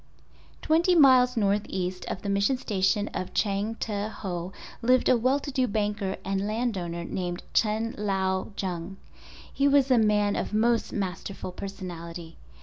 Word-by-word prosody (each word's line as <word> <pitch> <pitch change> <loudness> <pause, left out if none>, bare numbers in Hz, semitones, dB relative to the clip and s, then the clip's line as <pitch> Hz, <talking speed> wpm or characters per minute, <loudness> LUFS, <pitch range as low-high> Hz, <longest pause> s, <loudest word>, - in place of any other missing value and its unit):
Twenty 335 +3 +3
miles 255 -5 +6
northeast 195 -3 -1
of - - -5
the 200 - -3
Mission 200 +6 +2
Station 205 -2 0
of 185 - -5
Changteho 200 -3 -2 0.3
lived 255 +2 +3
a - - +6
well 255 +4 +2
to 285 - -6
do 260 -2 +1
banker 205 -2 -1
and 195 +1 -1
landowner 195 -7 -2
named 175 0 -4
Chen 220 +1 +1
Lao 190 -2 0
Jung. 180 0 -4 0.6
He 280 - +2
was 275 -1 +4
a 250 - +6
man 210 -1 +2
of - - -2
most 230 +1 +2
masterful 190 -1 -4
personality. 170 -3 -8
205 Hz, 140 wpm, -27 LUFS, 190-235 Hz, 0.6 s, miles